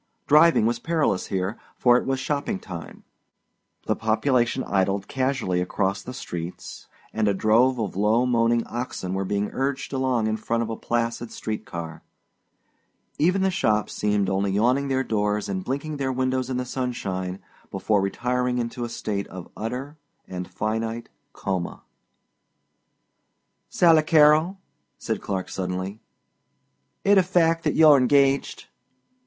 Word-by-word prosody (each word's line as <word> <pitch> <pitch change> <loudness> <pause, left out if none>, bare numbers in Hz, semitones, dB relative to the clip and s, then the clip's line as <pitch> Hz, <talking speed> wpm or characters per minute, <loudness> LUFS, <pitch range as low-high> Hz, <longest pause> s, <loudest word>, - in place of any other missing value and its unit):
Driving 155 -5 +5
was 120 +1 0
perilous 155 - 0
here, 95 +4 -2 0.2
for 120 -1 +5
it 125 - +1
was 135 0 0
shopping 140 -5 -2
time; 85 -3 -9 0.8
the - - +1
population 120 +3 +1
idled 95 0 0
casually 130 -9 0
across 95 +2 -1
the 120 - -8
streets 90 -9 -7 0.3
and 110 -1 +1
a 100 - +2
drove 115 +6 +3
of 105 -5 -3
low 110 +5 +2
moaning 115 -1 +2
oxen 120 -6 -4
were 95 0 -1
being 100 +1 -1
urged 135 +1 -2
along 130 -4 +1
in 110 0 0
front 115 +2 -1
of 115 - -4
a - - -2
placid 115 0 -2
street 110 -1 -5
car; 85 -2 -7 1.2
even 185 +4 +3
the 190 - +2
shops 110 - 0
seemed 105 -2 0
only 100 +1 0
yawning 125 +8 +2
their 130 -1 +1
doors 105 -3 -1
and 95 -2 -3
blinking 140 +5 -3
their 135 -1 -1
windows 130 0 -1
in 130 - -1
the 125 - -2
sunshine 95 -8 -3 0.3
before 105 -2 +1
retiring 125 +5 -1
into 120 +1 -3
a 120 - -3
state 100 -3 -3
of 90 -2 -10
utter 130 +7 -5 0.3
and 90 -1 -5
finite 115 +2 -3 0.2
coma. 95 -3 -4 1.9
"Sally 165 -3 +5
Carrol," 155 +3 +4 0.4
said - - -3
Clark 95 -2 -3
suddenly, 95 +3 -4 1.0
"it 200 0 +5
a - - +6
fact 165 -2 +2
that - - +1
you're 155 -3 +7
engaged?" 135 +1 +2
115 Hz, 145 wpm, -24 LUFS, 100-135 Hz, 1.9 s, you're